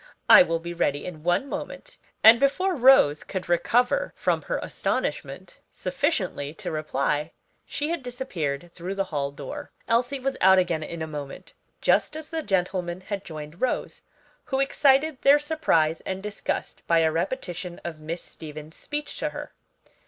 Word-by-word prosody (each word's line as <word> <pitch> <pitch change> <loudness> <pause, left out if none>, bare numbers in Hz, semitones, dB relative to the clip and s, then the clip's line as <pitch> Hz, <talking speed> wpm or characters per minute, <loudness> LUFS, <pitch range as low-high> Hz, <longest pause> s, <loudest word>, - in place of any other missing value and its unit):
I - - +10
will 165 -11 +2
be 170 +1 -6
ready 145 -4 0
in 165 -4 -7
one 175 - +1
moment." - - -7 0.2
And 225 +2 +9
before 365 +8 +2
Rose 255 - +5
could 190 -2 -5
recover 245 - +2
from - - 0
her - - -2
astonishment - - -3
sufficiently 185 - -2
to - - -5
reply 150 0 -1 0.3
she 290 +2 -2
had 340 -2 -2
disappeared 175 - -4
through 180 +3 -5
the 195 - +1
hall 140 -1 0
door. 140 -1 -8 0.2
Elsie 245 +4 +1
was 270 +1 -2
out 190 +1 +7
again 175 -3 +1
in 160 +1 -5
a - - -2
moment, 145 -3 -8 0.3
just - - +2
as 315 -1 -9
the 325 -1 -2
gentlemen 180 - -1
had 200 +1 -5
joined 155 0 -9
Rose, 255 - -1 0.4
who 270 - -1
excited 275 +1 +3
their 280 +1 +7
surprise 290 - +1
and 190 +1 -5
disgust 210 -1 -4
by 165 -1 +4
a 160 -1 +3
repetition 175 -1 -3
of 165 -2 -6
Miss 165 +3 -5
Stevens' 155 0 -10
speech 295 0 -5
to - - -1
her. - - -8
180 Hz, 160 wpm, -25 LUFS, 160-265 Hz, 0.4 s, I